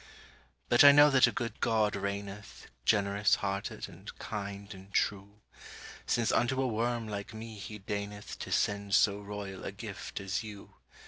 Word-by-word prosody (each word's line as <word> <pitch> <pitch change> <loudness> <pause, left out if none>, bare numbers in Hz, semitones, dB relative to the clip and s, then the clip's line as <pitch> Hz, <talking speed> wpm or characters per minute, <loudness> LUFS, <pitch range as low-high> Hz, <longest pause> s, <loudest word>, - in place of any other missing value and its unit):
But 120 - +6
I 145 - +11
know 145 +1 +7
that 135 -2 +6
a - - 0
good 115 -1 -4
God 110 -2 +2
reigneth, 100 +1 -5 0.2
Generous 100 +1 +3
hearted 100 0 -3
and - - -11
kind 100 -1 -6
and 95 +1 -13
true; 100 +1 -1 0.7
Since 115 -2 +2
unto 130 +2 +2
a 135 - +2
worm 115 0 -1
like 100 0 -6
me 110 0 -7
he 105 +2 -7
deigneth 105 +1 -5
To - - -6
send 100 -1 +1
so 100 -1 +4
royal 100 -2 -7
a - - -4
gift - - -7
as 100 +3 -2
you. 105 -3 -10
105 Hz, 165 wpm, -31 LUFS, 100-110 Hz, 0.7 s, I